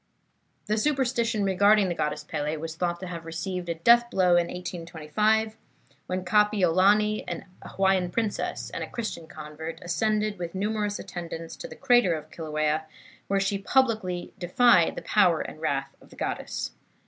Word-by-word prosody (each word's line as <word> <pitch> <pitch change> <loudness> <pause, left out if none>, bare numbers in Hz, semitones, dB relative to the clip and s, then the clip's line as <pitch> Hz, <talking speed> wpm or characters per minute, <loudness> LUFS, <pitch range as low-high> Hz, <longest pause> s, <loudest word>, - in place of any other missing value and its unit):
The 215 +1 0
superstition 240 -5 +1
regarding 200 +1 +4
the 175 - -1
Goddess 150 -2 -2
Pele 150 0 -3
was 160 +1 -6
thought 175 0 -1
to - - -4
have 170 -2 -6
received 170 +2 -4
a 170 - -1
death 235 +8 +5
blow 185 -5 +2
in 175 -1 +4
1825, 180 +6 -1 0.5
when 185 0 -3
Kapiolani, 210 +1 +3
an - - -5 0.2
Hawaiian 190 -2 +1
princess 215 +3 -2
and - - -4
a - - -7
Christian 220 -8 -5
convert, 155 +1 -8
ascended, 210 +3 0
with 175 0 -5
numerous 210 +1 -1
attendants, 165 -1 -7
to - - -7
the - - -10
crater 245 -10 +4
of 155 - -9
Kilauea, 155 -1 -1 0.4
where 195 0 +1
she 195 0 0
publicly 215 -7 0
defied 180 0 +4
the - - -6
power 180 -6 +3
and 155 - -7
wrath 135 -3 -2
of - - -18
the - - -15
goddess. - - -3
185 Hz, 160 wpm, -27 LUFS, 165-215 Hz, 0.5 s, death